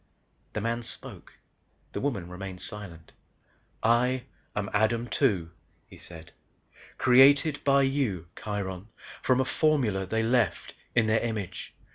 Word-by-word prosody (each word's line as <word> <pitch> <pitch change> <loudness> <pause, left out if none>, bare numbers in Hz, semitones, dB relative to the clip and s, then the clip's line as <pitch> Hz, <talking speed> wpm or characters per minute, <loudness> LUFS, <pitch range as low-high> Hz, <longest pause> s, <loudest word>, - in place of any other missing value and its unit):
The 110 - -2
man 115 +2 -1
spoke, 115 - -7 0.6
the - - -4
woman 120 -12 -2
remained 90 +1 -7
silent. 90 -7 -6 0.7
"I 125 +2 +3 0.3
am 105 -1 -2
Adam 110 +3 +1
Two," 95 - +1 0.3
he - - -15
said. 85 0 -12 0.7
"Created, 140 +4 +5
by 140 0 +4
you 135 - 0
Kiron 100 -2 -5 0.3
from 130 0 +2
a 130 - +2
formula 125 - +1
they 110 +3 0
left, 115 -4 +1 0.2
in 120 -2 +4
their 110 +1 +3
image. 110 -6 -4
110 Hz, 125 wpm, -28 LUFS, 95-130 Hz, 0.7 s, Created